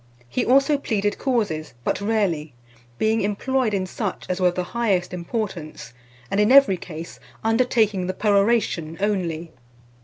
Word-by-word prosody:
He 240 - -1
also 275 +3 +3
pleaded 205 -5 -1
causes, 205 - -1
but - - -1
rarely, 195 - -1 0.4
being 220 - +1
employed 230 +4 0
in 195 -2 -1
such 195 +1 -4
as 185 +1 -2
were 180 - +5
of 175 - 0
the 180 - -1
highest 200 -7 0
importance, 175 - -5 0.4
and 200 - +1
in 210 +3 +4
every 275 -7 +7
case 165 -1 -9 0.2
undertaking 225 -4 +2
the 185 - -3
peroration 200 -6 +1
only. 175 -5 -1
200 Hz, 145 wpm, -23 LUFS, 175-225 Hz, 0.4 s, every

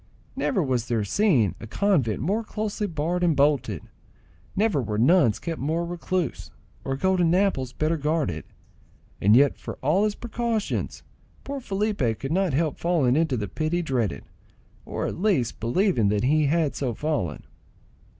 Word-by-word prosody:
Never 195 -8 0
was 125 -4 -1
there 115 -3 0
seen 125 - +2
a 115 - -8
convent 140 - +1
more 205 +8 0
closely 215 -1 -3
barred 170 +2 -1
and 170 -3 +3
bolted; 140 - +1 0.7
never 205 -9 +2
were 105 -3 -3
nuns 125 - +4
kept 165 -2 -5
more 160 +5 0
recluse, 175 -2 -3 0.3
or 135 - -2
golden 180 0 +2
apples 180 -10 +1
better 155 +4 0
guarded; 150 - -1 0.8
and 105 +3 +5
yet 140 +2 +4
for - - -6
all 155 +9 +3
his 210 -1 -1
precautions 235 -2 -3 0.4
poor 280 0 -4
Felipe 200 - -1
could 135 - -5
not 185 -2 +1
help 155 0 0
falling 160 -8 +2
into 155 -4 +1
the 105 -2 -3
pit 155 - -3
he 175 0 +1
dreaded,—or 125 -8 -5
at - - -4
least 135 - +1
believing 120 - +2
that 105 0 0
he 150 +3 +3
had 155 -1 +1
so 125 -5 -2
fallen. 145 - -2
155 Hz, 155 wpm, -25 LUFS, 125-185 Hz, 0.8 s, and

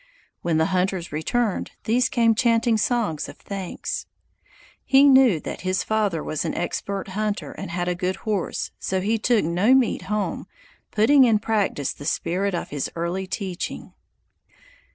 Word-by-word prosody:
When 170 -2 +1
the 160 - +3
hunters 185 -1 0
returned, 200 +8 -1
these 240 +3 +2
came 230 -2 +3
chanting 230 0 +2
songs 215 - 0
of - - -11
thanks. 195 -3 -5 0.8
He 270 +1 +5
knew 265 - +6
that - - -6
his 185 +1 0
father 205 -7 0
was 155 - -2
an - - -3
expert 195 +3 -3
hunter 210 +2 -2
and 195 - -7
had 175 +1 -2
a 180 - +1
good 180 +1 -2
horse, 205 -5 -2
so 190 - -1
he 215 +4 0
took 225 -5 +2
no 185 +10 +3
meat 260 -4 +2
home, 210 0 -2 0.4
putting 265 +6 +5
in 230 -4 +4
practice 205 -10 -1
the 145 - -11
spirit 185 +5 -1
of - - -4
his 145 -2 -3
early 175 +3 -2
teaching. 185 -2 -5
200 Hz, 155 wpm, -24 LUFS, 175-225 Hz, 0.8 s, knew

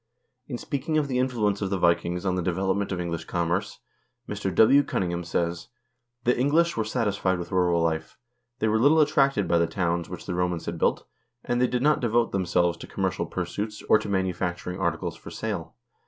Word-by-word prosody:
In 125 - -4
speaking 145 +5 -2
of 150 -2 +1
the 125 -2 -1
influence 110 -6 0
of 100 - -1
the 100 - 0
Vikings 85 +1 +1
on 95 - +1
the 90 - -1
development 95 +3 -1
of 90 - -2
English 85 -2 -3
commerce, 85 +3 -1 0.5
Mr. 100 -2 -3
W. 135 +8 +7
Cunningham 90 -9 -2
says: 85 0 -2 0.3
" 120 0 -52
The 125 - +3
English 155 +7 +2
were 115 - 0
satisfied 105 -5 0
with 85 -1 -6
rural 90 -2 +2
life; 80 -1 -2 0.4
they 110 - 0
were 110 +1 +2
little 145 +6 +5
attracted 140 - +3
by 85 - +3
the 85 - +2
towns 85 -1 -1
which - - -8
the - - -3
Romans 90 -1 -1
had 85 0 -4
built, - - +1 0.4
and 120 0 0
they 125 - +4
did 125 0 -1
not 150 +1 +4
devote 120 -1 +1
themselves 85 -2 +1
to - - -9
commercial - - -2
pursuits 105 +1 -4
or 110 - +6
to - - -6
manufacturing 90 -1 -2
articles 85 -3 -1
for - - -11
sale. - - -5
95 Hz, 200 wpm, -26 LUFS, 85-120 Hz, 0.5 s, W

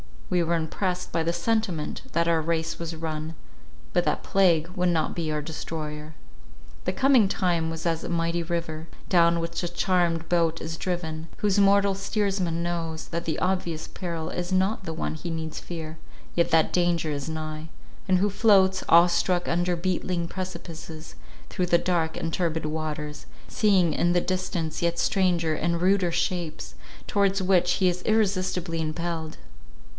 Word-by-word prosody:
We 180 - +3
were 170 0 +1
impressed 180 +3 -2
by 165 - 0
the 170 +1 0
sentiment, 185 -3 -1
that 170 0 +2
our 165 -1 +3
race 165 0 -1
was 165 -1 -4
run, 160 0 -4 0.6
but - - +1
that - - 0
plague 170 -4 +3
would 180 -1 0
not 160 -3 +1
be 165 -2 -2
our 150 -1 -1
destroyer. 150 0 -6 0.7
The - - 0
coming 265 -6 +5
time 175 -4 0
was 165 +1 -5
as 165 -1 0
a - - -4
mighty 170 0 0
river, 165 -1 -3 0.2
down 170 -2 +4
which 170 0 -3
a 175 - -1
charmed 175 -2 +1
boat 165 -2 +2
is 165 0 -5
driven, 165 -3 -3
whose 205 -1 +2
mortal 200 0 +5
steersman 195 -4 -1
knows, 165 -2 -3
that 170 0 -3
the 160 -2 -1
obvious 180 -4 -1
peril 170 -3 -4
is 175 +1 -4
not 190 +2 +1
the 165 - -3
one 160 - -3
he 170 +2 -6
needs 160 -1 -4
fear, 160 -2 -7 0.4
yet 170 - +2
that 160 -1 +3
danger 175 -3 +1
is 145 +1 -3
nigh; 155 0 -5 0.4
and 185 -1 +4
who 205 +2 +2
floats 195 -2 +4
awe 170 +1 +7
struck 175 +1 +1
under 175 +1 +1
beetling 175 -1 -1
precipices, 165 -4 -7 0.4
through 180 - -1
the 170 - +5
dark 170 -2 0
and 165 -1 -3
turbid 160 -3 -1
waters—seeing 155 +4 -1
in 175 0 +2
the 175 - +3
distance 185 -4 -2
yet 170 0 +1
stranger 175 -3 +2
and 170 +2 -1
ruder 185 -1 +3
shapes, 165 - -2 0.3
towards 195 -1 +1
which 180 -1 +3
he 185 -2 +3
is 180 0 -3
irresistibly 185 -6 +1
impelled. 160 0 -3
170 Hz, 165 wpm, -26 LUFS, 160-185 Hz, 0.7 s, awe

